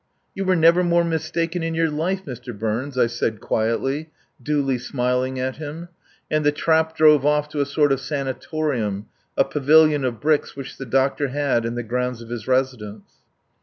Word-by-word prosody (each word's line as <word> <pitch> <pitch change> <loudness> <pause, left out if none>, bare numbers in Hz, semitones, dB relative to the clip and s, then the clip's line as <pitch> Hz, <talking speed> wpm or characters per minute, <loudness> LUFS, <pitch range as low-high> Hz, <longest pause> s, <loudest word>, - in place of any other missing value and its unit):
"You 195 - -3
were 185 0 +3
never 170 +2 +5
more 170 0 +3
mistaken 165 +1 -2
in 165 0 -2
your 165 -1 +1
life, 185 +6 -2
Mr. 125 -4 -8
Burns," 115 +6 -3
I 125 - +5
said 115 -2 -2
quietly, 135 +9 -1 0.3
duly 135 -1 0
smiling 125 +1 -1
at 130 0 -2
him; 160 +3 -7 0.4
and 155 0 +1
the 145 - +4
trap 160 +1 +1
drove 150 -3 +6
off 150 0 +2
to 150 -1 -2
a 140 - 0
sort 145 0 +2
of 135 - +2
sanatorium, 135 -6 -2 0.3
a - - +4
pavilion 150 0 +4
of 120 -4 -2
bricks 150 +4 +1
which 135 -1 -8
the 135 - -6
doctor 135 +3 +1
had 135 -3 0
in 115 - -4
the 120 - -3
grounds 125 +1 -2
of 115 -1 -11
his 120 -3 -6
residence. 125 -6 -2
140 Hz, 180 wpm, -22 LUFS, 125-155 Hz, 0.4 s, drove